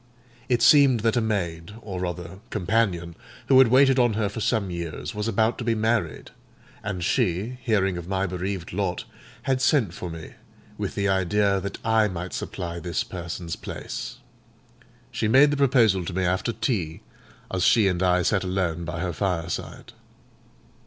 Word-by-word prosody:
It 120 -2 +2
seemed 140 -6 +6
that 115 +1 +1
a 120 - +2
maid, 85 -5 -2
or 95 -4 -5
rather 90 +1 -5
companion, 95 -4 0 0.3
who 130 - +7
had 130 - +7
waited 135 +2 +5
on 120 -2 +3
her 105 -1 0
for 105 - -6
some 105 -4 0
years, 85 -3 -5
was 105 +1 -3
about 110 +1 +1
to - - -3
be 115 -1 +1
married; 110 -6 -1 0.5
and 95 -4 -4
she, 100 +9 0
hearing 95 -7 +1
of 85 - -9
my 95 0 0
bereaved 90 -1 -4
lot, 95 -2 -2 0.4
had 130 -1 0
sent 130 - +2
for 90 - -6
me, 80 -1 -9 0.4
with - - -4
the 100 - 0
idea 100 +1 +2
that 100 +1 -5
I 110 -1 +3
might 90 -2 -5
supply 85 -1 -5
this 85 0 -2
person's 85 -2 -6
place. - - -6 1.0
She 120 -3 -1
made 135 +6 +6
the - - +1
proposal 120 -9 +3
to 95 - -5
me 95 +1 0
after 95 +6 0
tea, 100 - -2 0.5
as 95 -2 0
she 110 -4 +5
and 90 -2 0
I 90 -1 +3
sat 95 +2 +1
alone 90 -3 -1
by 85 0 -4
her 90 -2 -2
fireside. 90 -2 -3
95 Hz, 170 wpm, -25 LUFS, 90-115 Hz, 1.0 s, who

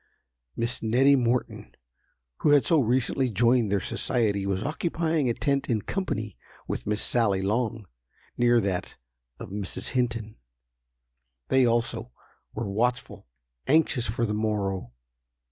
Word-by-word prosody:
Miss 120 +2 -2
Nettie 130 +5 +4
Morton, 125 -1 -1 0.6
who - - +1
had 145 -2 +5
so 165 - +4
recently 130 +1 +1
joined 120 0 +2
their 100 - +2
society, 100 0 0
was 95 0 -1
occupying 160 -1 -1
a 115 - 0
tent 140 -1 -1
in 110 -4 0
company 110 - -3 0.3
with - - -4
Miss 105 0 0
Sally 105 -6 +2
Long, 110 +1 -1 0.5
near 120 0 +4
that 95 -3 -3 0.4
of - - -8
Mrs. 100 -1 -5
Hinton. 115 -4 -2 1.1
They 130 -2 +4
also, 120 0 -1 0.4
were 115 0 -3
watchful—anxious 110 - -1
for 115 +2 -1
the 105 - -2
morrow. 100 - -2
115 Hz, 125 wpm, -26 LUFS, 105-125 Hz, 1.1 s, had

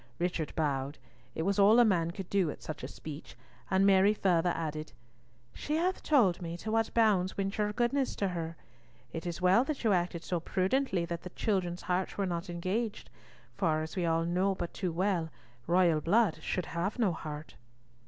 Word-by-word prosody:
Richard 175 -3 -1
bowed. 140 -2 -1 0.4
It 160 - -1
was 200 +2 +1
all 205 +3 +7
a 240 - +7
man 170 -6 +2
could 185 +1 -6
do 190 -5 +1
at - - -8
such 155 - -6
a - - -4
speech, 155 -1 -9 0.3
and 190 +1 +3
Mary 200 +1 +5
further 180 -3 +2
added, 155 -3 -4 0.6
"She 300 - -3
has 360 +4 0
told 215 - +3
me 170 0 -5
to 215 +5 -5
what 225 0 +1
bounds 205 -5 +3
went 195 0 -1
your 210 0 +1
goodness 250 +4 0
to 200 - 0
her. 165 -2 -4 0.6
It 165 +2 -4
is 175 +1 -5
well 190 +6 +5
that 305 -3 -3
you 220 -3 +4
acted 175 -2 -1
so 175 - -1
prudently 190 +2 0
that 170 0 -4
the 180 - -7
children's 180 -3 -1
hearts 180 +1 -1
were 200 - +1
not 175 0 -3
engaged; 190 +6 -3 0.4
for, 155 -4 +1
as 160 - -7
we 180 -3 0
all 165 0 +1
know 185 +3 +1
but 175 -2 -5
too 180 -3 -2
well 175 -1 0 0.4
royal 170 -3 +3
blood 190 -1 +2
should 180 +2 -2
have 170 +8 -3
no 220 -6 +2
heart." 155 -1 -7
180 Hz, 195 wpm, -31 LUFS, 165-200 Hz, 0.6 s, all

